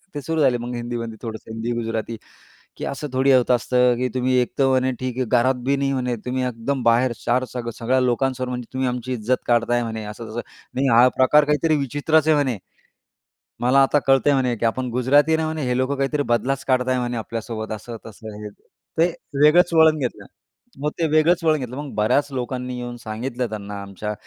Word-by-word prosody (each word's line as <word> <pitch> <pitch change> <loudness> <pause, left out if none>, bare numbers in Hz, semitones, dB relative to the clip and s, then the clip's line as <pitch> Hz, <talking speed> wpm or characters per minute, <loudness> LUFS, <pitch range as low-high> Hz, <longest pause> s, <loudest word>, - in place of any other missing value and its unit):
ते 145 - -3
सुरू 160 +2 -1
झाले 125 -3 +3
मग 120 +1 -5
हिंदीमध्ये 120 -2 -5
थोडंसं 110 -1 -7
हिंदी 115 +2 -3
गुजराती, 115 -1 -3 0.6
की - - -5
असं 140 +2 -4
थोडी 135 +1 +3
होत 125 -1 +3
असतं, 125 0 +3
की 125 +1 -1
"तुम्ही 130 0 +1
एक 120 - -2
तर 135 - +4
म्हणे 130 0 +2
ठीक 130 -1 -4
आहे 130 - 0
घरात 125 +2 +2
बी 140 - +2
नाही 135 0 0
म्हणे 125 -2 -1
तुम्ही 130 +1 -1
एकदम 125 +2 -3
बाहेर 120 +2 +3
चार 125 +2 +2
सग 120 -2 -4
सगळ्या 130 +3 +1
लोकांसमोर 130 +1 0
म्हणजे 125 -2 -5
तुम्ही 130 0 0
आमची 125 +1 -4
इज्जत 120 +2 -1
काढताय" 120 0 +2
म्हणे 110 -1 -5
असं 110 +2 -8
तसं. 120 +2 -3 0.3
नाही 135 +1 +1
हा 120 +1 +6
प्रकार 145 +3 +5
काहीतरी 150 +2 +2
विचित्रच 145 +3 +1
आहे 155 - +5
म्हणे. 130 -6 0 1.0
मला 130 +3 +4
आता 145 +2 +3
कळतंय 135 +2 +4
म्हणे, 125 -3 +1
की 115 - -1
आपण 125 +3 -1
गुजराती 140 +5 +3
आहे 160 - +4
ना - - 0
म्हणे, 155 -2 -3
हे 125 0 0
लोकं 130 +2 0
काहीतरी 140 +2 0
बदलाच 135 +3 -1
काढत 130 -1 +1
आहे 130 0 +1
म्हणे 120 -1 -2
आपल्यासोबत 110 -1 -5
असं-तसं 110 -1 -9
हे. 105 - -6 0.5
ते 165 - +6 0.4
वेगळंच 170 +3 +5
वळण 160 -1 +5
घेतलं. 125 -3 -4 0.5
मग 150 - 0
ते 165 - +2
वेगळंच 165 +3 +3
वळण 155 -2 +3
घेतलं. 125 -1 -6
मग 145 -2 -6
बऱ्याच 125 +7 +2
लोकांनी 125 0 -4
येऊन 120 0 -5
सांगितलं 120 +3 -4
त्यांना 100 -1 -6
आमच्या 100 +2 -5
125 Hz, 205 wpm, -22 LUFS, 120-135 Hz, 1.0 s, हा